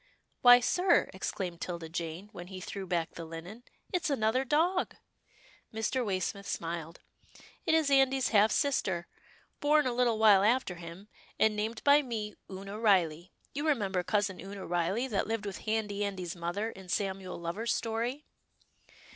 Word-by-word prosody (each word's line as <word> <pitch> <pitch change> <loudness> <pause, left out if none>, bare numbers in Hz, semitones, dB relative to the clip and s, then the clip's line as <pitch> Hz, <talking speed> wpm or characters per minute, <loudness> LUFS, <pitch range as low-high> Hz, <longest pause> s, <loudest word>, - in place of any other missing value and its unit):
" - - -45
Why, 245 -1 +9
sir," 355 +7 +3
exclaimed 185 -2 -4
'Tilda 170 -2 -4
Jane 170 +4 -5
when 175 - -9
he 185 0 -8
threw 190 +1 -6
back 170 -2 -1
the 170 - -8
linen, 165 +7 -8 0.3
it's 355 -3 0
another 255 -1 +1
dog." 335 +7 +1 0.8
Mr. 225 +4 -1
Waysmith 200 -1 -2
smiled. 165 -1 -4 0.3
" - - -22
It 320 - +4
is 310 -3 +2
Andy's 270 -1 +4
half 215 0 +5
sister, 190 - 0 0.5
born 300 0 +4
a 255 - 0
little 240 -2 +2
while 210 -3 +6
after 230 -3 +2
him, 170 +4 -10 0.3
and 220 -1 +3
named 220 +2 -3
by 285 +1 +6
me 220 -6 -4 0.2
Oonah 195 +2 -7
Riley. 180 -5 +2 0.2
You 290 +3 -2
remember 200 -11 +1
Cousin 205 0 0
Oonah 195 0 -7
Riley, 175 +8 0
that 210 -6 -1
lived 225 -1 -2
with 200 -2 -5
Handy 210 -2 -1
Andy's 185 -4 -4
mother 175 +6 -3
in 190 -3 -13
Samuel 190 -1 -2
Lover's 185 +8 -2
story 235 +6 -2
205 Hz, 160 wpm, -31 LUFS, 180-245 Hz, 0.8 s, Why